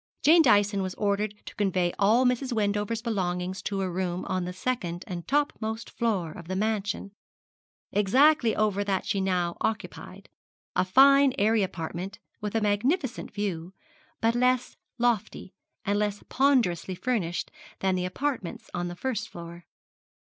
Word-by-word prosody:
Jane 330 +3 +7
Dyson 205 -7 +4
was 185 -1 -3
ordered 205 0 0
to - - -8
convey 185 -4 0
all 220 +6 +4
Mrs. 250 +1 +1
Wendover's 210 0 0
belongings 185 -4 -2
to 200 -1 -2
a 190 - 0
room 180 0 -2
on 185 -2 -1
the 180 - -4
second 185 -3 -3
and 175 -2 -6
topmost 230 -6 -1
floor 200 -9 -1
of 170 +1 -10
the 185 - -3
mansion, 205 -1 -1 0.8
exactly 240 +4 +4
over 205 -2 +1
that 195 -2 -1
she 195 - 0
now 180 -2 0
occupied 220 0 -4 0.5
a - - +3
fine 275 +7 +6
airy 215 +2 +3
apartment, 185 +1 -4 0.2
with 210 +1 -4
a 225 - +2
magnificent 240 - 0
view, 190 -3 -4 0.5
but 225 +1 +3
less 250 +1 +1 0.2
lofty, 230 -5 -1 0.3
and 205 0 +1
less 205 -1 -1
ponderously 230 - +2
furnished 180 -6 -2 0.3
than 190 -1 +2
the 180 -1 -1
apartments 250 0 -3
of 175 0 -2
the 175 - -6
first 240 +3 -3
floor. 170 0 -10
205 Hz, 150 wpm, -27 LUFS, 185-230 Hz, 0.8 s, Jane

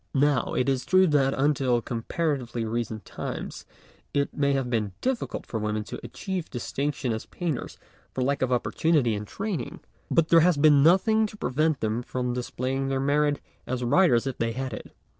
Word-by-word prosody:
Now, 145 0 +2
it 125 - +1
is 135 -2 +1
true 185 +6 +5
that 140 -5 +2
until 135 -3 +2
comparatively 120 0 -2
recent 110 -1 -3
times - - -6 0.5
it 140 0 0
may 140 -1 +2
have 135 -2 0
been 110 -5 -1
difficult 255 -2 -2
for 115 - -4
women 105 0 -1
to - - -7
achieve 190 -4 -5
distinc 140 +4 -2
tion 125 -4 -2
as 110 - -5
painters 165 -8 -4 0.3
for 130 - -2
lack 140 +2 0
of 130 -1 +1
opportunity 125 0 +2
and 105 0 -4
training, 195 - -4 0.3
but 165 -1 +2
there 165 - +7
has 170 -1 +4
been 145 -1 +6
nothing 215 +7 +4
to 210 - -12
pre 130 - -3
vent 155 +1 +1
them 110 +2 0
from 125 0 -3
displaying 130 +2 -2
their 135 0 0
merit 145 +1 +1 0.3
as 125 0 -2
writers 120 -1 +4
if 135 -2 -4
they 115 0 0
had 130 0 -4
it. - - -8
135 Hz, 185 wpm, -26 LUFS, 120-155 Hz, 0.5 s, there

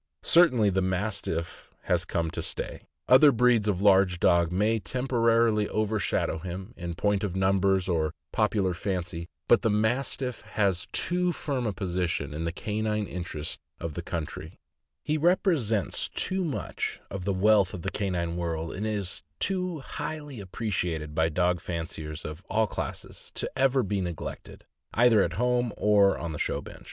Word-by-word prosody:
Certainly 125 - +5
the 95 +1 +1
Mastiff 95 -3 -2
has - - +1
come 80 -1 -1
to - - -4
stay. - - -4 0.2
Other 140 +3 +8
breeds 120 -3 +3
of 100 -2 0
large 95 -3 +5
dogs 85 -1 +3
may 105 +5 +2
temporarily 115 -3 +2
overshadow 110 -6 0
him, 95 +5 -7
in 85 -2 -5
point 100 +2 +1
of 95 -3 -2
numbers 95 0 +2
or 80 -4 +1 0.2
popular 105 -4 +1
fancy, 85 -2 -3 0.2
but - - +5
the 115 - +2
Mastiff 120 +4 0
has 95 -4 0
too 180 +1 +1
firm 135 -7 -2
a - - 0
position 90 -5 -2
in 80 +2 -3
the 85 - -1
canine 105 +3 -2
interests 85 -5 -5 0.2
of 85 -2 -4
the 85 - -4
country 85 -1 -5 0.2
— - - -58
he 155 +1 0
rep 175 +6 +3
resents 115 - +1
too 190 0 0
much 155 -6 -3
of 95 -1 -4
the 100 - 0
wealth 100 0 +4
of 85 - -7
the 95 - -2
canine 90 -4 -2
world, 80 -1 -3
and 105 +4 -3
is 100 -4 -2 0.2
too 180 -5 -1
highly 145 -2 -6
appreciated 90 -6 -3
by 80 +1 +2
dog 90 +2 +1
fanciers 80 -3 -5
of 75 +4 -7
all 110 0 +2
classes— - - -6
to - - 0
ever 135 -1 +3
be 100 -1 -1
neglected, 85 -4 -6 0.3
either 115 -2 +5
at - - 0
home 125 0 +1
or 100 -2 +4
on 85 - -4
the 75 - -5
show - - -1
bench. - - -11
100 Hz, 165 wpm, -27 LUFS, 90-115 Hz, 0.3 s, Other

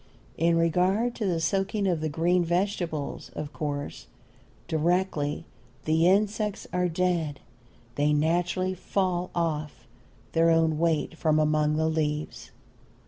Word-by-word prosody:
In 165 +1 +2
regard 185 +8 +2
to 215 - -1
the 170 -3 0
soaking 195 +4 0
of 175 -5 +1
the 155 - -1
green 175 +4 +2
vegetables, 175 -4 -2
of 150 -1 -5
course, 145 -2 -4 0.6
directly 160 -2 0 0.4
the 160 +2 +3
insects 210 +2 +1
are 180 0 +1
dead 165 -4 0 0.5
they 145 +1 +1
naturally 175 +5 +1
fall 180 -1 -1
of 155 -7 -2 0.5
their 165 0 +3
own 160 -2 +3
weight 165 -2 +1
from 155 -2 +1
among 150 0 +2
the 160 +1 +1
leaves. 155 -1 -2
165 Hz, 125 wpm, -27 LUFS, 155-180 Hz, 0.6 s, the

